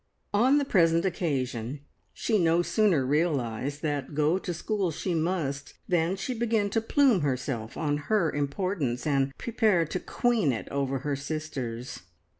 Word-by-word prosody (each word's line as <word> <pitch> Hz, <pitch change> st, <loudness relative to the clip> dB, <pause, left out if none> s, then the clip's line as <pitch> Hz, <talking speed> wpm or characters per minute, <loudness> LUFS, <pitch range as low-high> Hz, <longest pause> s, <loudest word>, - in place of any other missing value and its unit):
On 250 Hz, +7 st, +4 dB
the 285 Hz, -, +1 dB
present 170 Hz, -6 st, +3 dB
occasion 135 Hz, -7 st, -2 dB, 0.3 s
she 220 Hz, -3 st, 0 dB
no 170 Hz, 0 st, +3 dB
sooner 185 Hz, -, +2 dB
realised 140 Hz, -2 st, -1 dB
that 145 Hz, -2 st, -2 dB
go 155 Hz, +5 st, +2 dB
to 185 Hz, -, -4 dB
school 195 Hz, +2 st, -1 dB
she 175 Hz, +3 st, -3 dB
must, 155 Hz, -4 st, -2 dB
than 175 Hz, 0 st, +1 dB
she 250 Hz, +6 st, -3 dB
began 225 Hz, -3 st, 0 dB
to 225 Hz, -, +1 dB
plume 245 Hz, -, +3 dB
herself 130 Hz, -4 st, -2 dB
on 145 Hz, -2 st, 0 dB
her 210 Hz, -7 st, +3 dB
importance, 145 Hz, -3 st, -2 dB
and 140 Hz, -2 st, +1 dB
prepare 215 Hz, -7 st, +2 dB
to 185 Hz, -, -3 dB
queen 235 Hz, -, +1 dB
it 115 Hz, -, -4 dB
over 135 Hz, -1 st, -1 dB
her 145 Hz, -1 st, 0 dB
sisters. 135 Hz, -5 st, -5 dB
160 Hz, 150 wpm, -28 LUFS, 140-195 Hz, 0.3 s, On